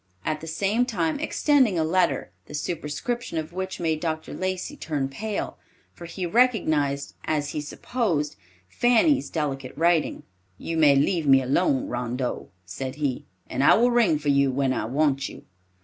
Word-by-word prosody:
at 155 - -1
the 160 - -8
same 200 +8 +1
time 175 - -1
extending 280 - +2
a 160 - +2
letter, 155 - +1 0.2
the 150 - -7
superscription 165 +8 -3
of 160 +1 -4
which 190 +1 -4
made 160 -3 0
Dr. 160 -1 -3
Lacey 185 +9 -3
turn 150 - -2
pale, 210 +10 -4 0.3
for 170 - -10
he 180 +2 -5
recognized, 160 - +1
as 150 -2 -1
he 150 - -3
supposed, 155 - -2 0.3
Fanny's 245 - +3
delicate 135 -5 -3
handwriting. 170 0 +1 0.3
"You 165 - -4
may 150 -3 +5
leave 150 +3 +1
me 135 -1 +7
alone, 135 0 +1
Rondeau," 125 +1 -3 0.2
said 130 +9 -5
he, 145 -4 -2 0.2
"and 130 +2 -1
I - - +7
will 240 +2 +3
ring 225 -10 +3
for 145 0 -2
you 140 -1 +4
when 130 0 +1
I - - -2
want 135 +2 +1
you." - - -12
155 Hz, 165 wpm, -25 LUFS, 140-190 Hz, 0.3 s, me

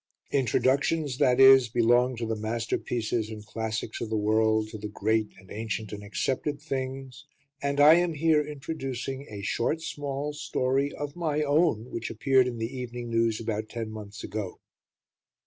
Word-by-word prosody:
Introductions, 140 +2 +1
that 125 -3 +4
is, 135 -2 +8
belong 120 +2 +3
to 115 0 -3
the 110 0 -1
masterpieces 115 0 -2
and 105 -1 -8
classics 110 0 -4
of 115 - -3
the 110 - 0
world, 110 +1 +2
to 110 - -8
the 105 - -5
great 110 +1 0
and 95 -1 -17
ancient 110 -1 -4
and 105 0 -7
accepted 130 +9 -2
things; 135 -2 -5 0.3
and 140 0 -1
I 150 +2 +9
am 175 -2 +1
here 155 0 +3
introducing 135 -2 -5
a 100 -2 -7
short, 120 +9 0
small 145 -2 -4
story 135 -1 0
of 145 -1 -6
my 155 -3 0
own 145 -6 +2
which 115 0 -4
appeared 130 +3 +3
in 120 -2 -4
The 115 +4 -4
Evening 120 -1 -5
News 115 -1 +2
about 110 -1 -3
ten 115 -2 -5
months 105 0 -8
ago. 105 -3 -5
120 Hz, 165 wpm, -27 LUFS, 110-140 Hz, 0.3 s, I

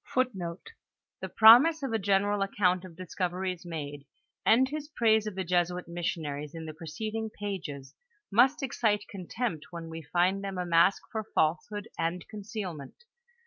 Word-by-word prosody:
* - - -61
hi. 260 -3 +2
■^^i^:m 180 -9 -6 0.4
* - - -63
The - - -4
promise 265 +8 +7
of 265 -4 -2
a 225 - +1
general 200 +1 +1
account 185 -2 +1
of 180 -3 -11
discoyerics 180 0 -3
made, 145 -4 -6 0.4
and 255 +4 +5
his 295 +1 -5
praise 220 -6 +2
of 210 - -5
the 190 - -2
Jesuit 180 0 0
missionaries 155 -3 -4
in 165 -1 -6
the 155 - -6
preceding 215 +8 -5
pages, 175 -11 -6 0.4
must 245 +7 +4
excite 215 -5 0
contempt 195 -2 -4
when 170 -2 -7
we 165 0 -7
find 180 +5 +1
them 195 -1 -4
a 180 - -2
mask 175 +3 +4
for 220 -1 -2
falsehood 190 +6 0
and 170 +1 -2
concealment. 200 - -6
185 Hz, 165 wpm, -29 LUFS, 170-220 Hz, 0.4 s, promise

